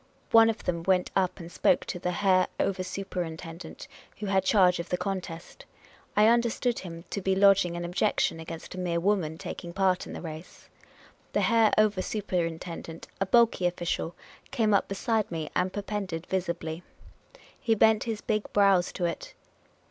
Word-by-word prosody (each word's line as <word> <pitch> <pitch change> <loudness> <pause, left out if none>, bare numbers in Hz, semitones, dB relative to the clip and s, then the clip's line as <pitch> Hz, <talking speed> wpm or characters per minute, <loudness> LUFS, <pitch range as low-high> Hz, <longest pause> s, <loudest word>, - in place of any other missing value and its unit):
One 225 0 +7
of 225 - -3
them 170 -2 -1
went 180 +1 +1
up 190 -1 +1
and 170 0 -9
spoke - - +2
to 180 - -5
the 180 - -2
Herr 185 0 +3
Over 190 -1 0
Superintendent 175 -3 -6 0.3
who 210 - -5
had 195 -1 +2
charge 185 -3 +4
of 170 - -5
the 180 - 0
contest. 185 -4 -5 0.5
I 210 - +6
understood 235 +1 +2
him 170 -2 -8
to 200 - -3
be 190 0 +1
lodging 195 -3 +4
an 175 - -4
objection 175 -1 0
against 160 0 -8
a 185 - -6
mere 175 -2 0
woman 175 -4 0
taking 170 +1 -7
part 190 -1 +1
in - - -8
the - - -6
race. 160 +1 -9 0.6
The - - +2
Herr 225 -2 +4
Over 210 -3 +3
Superintendent, 170 -5 -4
a 195 - 0
bulky 230 -4 +4
official, 175 -1 -3 0.3
came 225 -6 +1
up 200 - +3
be 195 - -4
side 220 +1 0
me 160 -3 -4
and 180 +1 +1
perpended 195 -5 -4
visibly. 170 -3 -3 0.8
He 225 -2 +1
bent 220 0 +4
his 220 -3 -3
big 215 -1 -2
brows 195 -3 +4
to 180 - -2
it. 170 -2 -4
185 Hz, 170 wpm, -28 LUFS, 170-205 Hz, 0.8 s, One